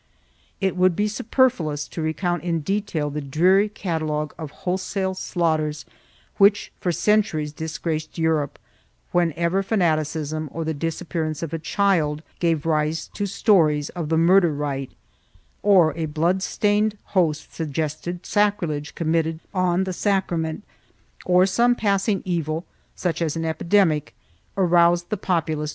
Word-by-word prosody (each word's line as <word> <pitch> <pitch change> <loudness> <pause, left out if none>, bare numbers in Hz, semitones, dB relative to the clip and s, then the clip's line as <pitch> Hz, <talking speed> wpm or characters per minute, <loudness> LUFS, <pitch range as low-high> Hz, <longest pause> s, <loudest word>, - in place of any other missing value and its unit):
It 190 -2 0
would 185 -1 +3
be 210 +3 +1
superfluous 210 - 0
to 165 - -5
recount 175 +3 -1
in 170 -2 -1
detail 170 -5 -2
the 150 +1 -3
dreary 180 +9 +3
catalogue 155 -6 -3
of 155 -3 -7 0.2
wholesale 190 +1 -1
slaughters 155 -5 -1 0.5
which 205 +1 +4
for 180 - 0
centuries 175 -6 +1
disgraced 160 0 -4
Europe, 160 -3 0 0.5
whenever 170 +2 +1
fanaticism 155 -6 -1
or 165 -1 -4
the 160 - -1
disappearance 160 0 -3
of 165 -1 -5
a 165 - -2
child 160 -4 +1 0.2
gave 165 -3 +1
rise 155 0 0
to 205 - -2
stories 165 -8 +3
of 170 -4 -5
the 160 - +2
murder 175 +1 +5
rite, 140 -2 -3 0.7
or 180 -7 +4
a 165 -1 -2
blood 165 +5 0
stained 210 +2 +1 0.2
host 160 -5 +1
suggested 160 +3 -4
sacrilege 175 -8 0
committed 160 -1 0
on 185 -1 +1
the 190 -1 -3
sacrament, 175 -4 -1 0.6
or 180 0 +5
some 235 +6 +3
passing 200 -2 0
evil, 165 -2 -2 0.3
such 170 -2 -2
as 160 -2 0
an 165 0 -2
epidemic, 160 -2 +1 0.4
aroused 175 -1 +3
the - - +2
populace 190 - -13
to 170 -4 +2
bloodshed - - -3
and 155 - -2
rapine. 150 0 -3
170 Hz, 140 wpm, -23 LUFS, 155-190 Hz, 0.7 s, murder